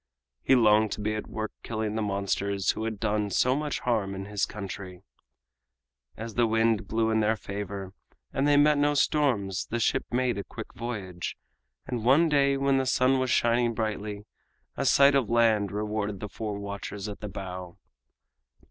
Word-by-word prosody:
He 135 - +4
longed 110 -2 +4
to - - -6
be 105 +1 -1
at 105 - -4
work 110 -1 -4
killing 110 -2 -3
the 110 - -1
monsters 100 -1 0
who 110 - -4
had 110 -2 -4
done 105 -1 0
so 125 +7 +2
much 150 0 -2
harm 105 -5 0
in 95 0 -5
his 100 -1 -1
country. 95 -2 -7 1.1
As 115 0 -6
the 120 +1 +2
wind 115 -1 +2
blew 110 0 +1
in 110 - +2
their 110 +1 +2
favor 100 -2 -6 0.4
and 135 +2 +1
they 145 0 +5
met 150 0 +5
no 145 0 +2
storms 120 -11 +1
the 120 - -2
ship 115 - +1
made 125 -3 0
a - - -3
quick - - -9
voyage, 100 -7 -5 0.5
and 120 -4 -4
one 145 +7 +5
day 140 -2 +3
when 135 0 +2
the 130 - -1
sun 130 +1 +3
was 130 0 0
shining 120 0 +2
brightly 105 -2 -3 0.5
a 140 - -1
sight 140 +2 +6
of 135 -6 +2
land 115 -4 +3
rewarded 105 -1 -2
the 105 - -6
four 105 -1 -4
watchers 100 0 -6
at 105 - -7
the 105 - -6
bow. 90 -2 -7
110 Hz, 180 wpm, -27 LUFS, 100-125 Hz, 1.1 s, sight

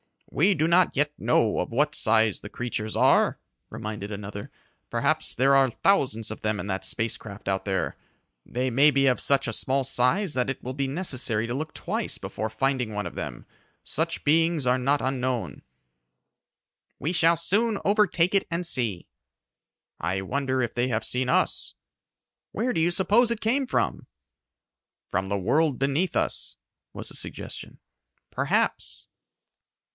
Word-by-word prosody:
"We 185 +6 +3
do 155 +1 +1
not 175 +1 +3
yet 145 +1 +1
know 115 -1 +2
of - - -2
what 150 +5 +1
size 110 -9 +3
the 105 - -9
creatures 115 -2 -4
are," - - +4 0.3
reminded 105 -1 -6
another. 100 0 -7 0.4
"Perhaps 140 +7 0
there 135 +3 +4
are 135 -1 +5
thousands 115 - +1
of 110 - -7
them 110 -1 -1
in - - -5
that 95 -1 -3
space 115 +4 0
craft 105 -2 -11
out 95 0 -1
there. 95 -1 -2 0.5
They 125 +2 -2
may 140 +5 +5
be 140 -1 +2
of 125 - +2
such 140 -2 +2
a 110 - -2
small 135 +4 0
size 135 +8 +2
that 125 0 0
it 135 - -5
will 130 - -4
be 135 0 -2
necessary 130 - 0
to 120 - -3
look 155 +4 -4
twice - - -1
before 110 - -4
finding 125 0 -1
one 105 -1 -3
of 85 - -6
them. - - -6 0.4
Such 165 +2 -2
beings 165 -1 +2
are 125 +1 +3
not 140 +3 +1
unknown." 130 -2 -2 1.4
"We 160 - -2
shall 170 -1 +4
soon 200 +7 +1
overtake 200 -4 +2
it 195 - +2
and 170 +1 -2
see." 115 - -1 0.9
"I 95 +3 -1
wonder 130 +5 -1
if 120 - -3
they 120 +1 0
have 110 -3 -1
seen 125 0 -1
us?" - - 0 0.8
"Where 245 +4 -1
do - - 0
you 170 - +3
suppose 210 +7 +3
it 235 -1 -2
came 260 +4 +1
from?" 60 - -1 1.0
"From 95 +2 -1
the 100 +1 -1
world 135 - +1
beneath 140 +7 0
us," - - -2 0.4
was - - -6
the - - -8
suggestion. - - -6 0.5
"Perhaps." - - -1
130 Hz, 160 wpm, -26 LUFS, 110-165 Hz, 1.4 s, are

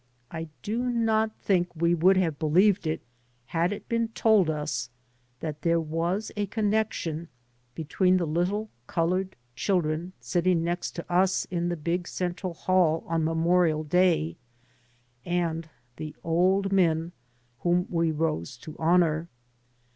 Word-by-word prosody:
I 165 0 -5 0.2
do 230 +4 -1
not 220 -2 +1
think 180 -3 0
we 170 +2 +2
would 185 +3 +4
have 165 -6 0
believed 180 +4 +3
it 155 - -1 0.4
had 165 - 0
it 205 - -6
been 230 0 0
told 220 -5 +3
us 150 -5 -2 0.5
that 155 -2 -5
there 170 0 +2
was 165 +6 -2
a 205 -1 -1
connection 205 -6 -1 0.5
between 180 +4 +2
the 175 - 0
little 180 +7 -1 0.2
coloured 185 +3 0 0.2
children 175 -1 0
sitting 175 -1 +1
next 175 +1 -2
to 170 - -5
us 185 +2 +2
in 175 -1 -1
the 175 - -2
big 175 +3 -2
central 180 0 -3
hall 170 -3 +2
on 165 -1 0
Memorial 165 0 +2
Day, 165 - +2 0.9
and 165 -1 -1 0.3
the 155 -1 -6
old 185 +4 +2
men 170 -3 +2 0.5
whom 175 +1 +2
we 165 -1 +1
rose 150 - -2
to 155 +5 -10
honour. 165 -1 +2
175 Hz, 135 wpm, -27 LUFS, 160-185 Hz, 0.9 s, would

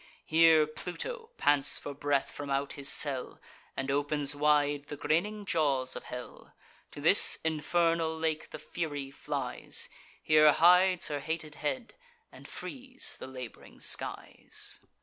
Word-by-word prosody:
Here 160 -1 +6
Pluto 450 - -6
pants 145 -1 +3
for 145 - -6
breath 140 0 0
from 145 -1 -7
out 140 +1 -1
his 140 -1 -3
cell, 140 -2 +1 0.4
And 135 +1 -2
opens 145 0 0
wide 145 -1 +2
the 145 - -7
grinning 205 +8 0
jaws 140 -8 0
of - - -7
hell. 125 0 -9 0.4
To - - -8
this - - +6
infernal 160 +1 +1
lake 160 -1 -2
the - - -7
Fury 145 -5 -5
flies; 140 - -3 0.3
Here 155 -1 +6
hides 180 +2 +5
her 145 -1 -2
hated 155 0 -4
head, 230 - -3 0.4
and - - -13
frees 260 -1 -5
the - - -7
lab'ring 130 -3 -10
skies. - - -3
150 Hz, 135 wpm, -30 LUFS, 140-165 Hz, 0.4 s, Here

